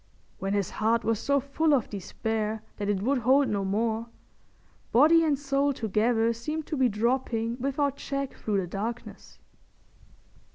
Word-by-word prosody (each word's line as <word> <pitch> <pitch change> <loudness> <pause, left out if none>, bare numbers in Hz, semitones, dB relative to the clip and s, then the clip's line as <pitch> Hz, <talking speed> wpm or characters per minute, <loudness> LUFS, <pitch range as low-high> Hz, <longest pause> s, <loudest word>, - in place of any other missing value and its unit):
When 195 +1 -2
his 200 -3 -1
heart 225 +2 +1
was 225 -2 0
so 280 +3 +2
full 285 +3 +1
of 250 - 0
despair 215 +2 -3
that 205 0 -3
it 200 -1 0
would 265 +3 +2
hold 265 +3 +3
no 200 -1 -1
more, 220 +3 -1 0.8
body 320 +7 +6
and 300 -3 +2
soul 280 0 +1
together 225 0 +1
seemed 305 +7 -4
to 310 - -3
be 260 -3 +3
dropping 235 +1 -1
without 275 +1 -1
check 275 -1 -4
through 205 -3 -1
the - - -3
darkness. 215 +7 -6
235 Hz, 155 wpm, -27 LUFS, 215-275 Hz, 0.8 s, body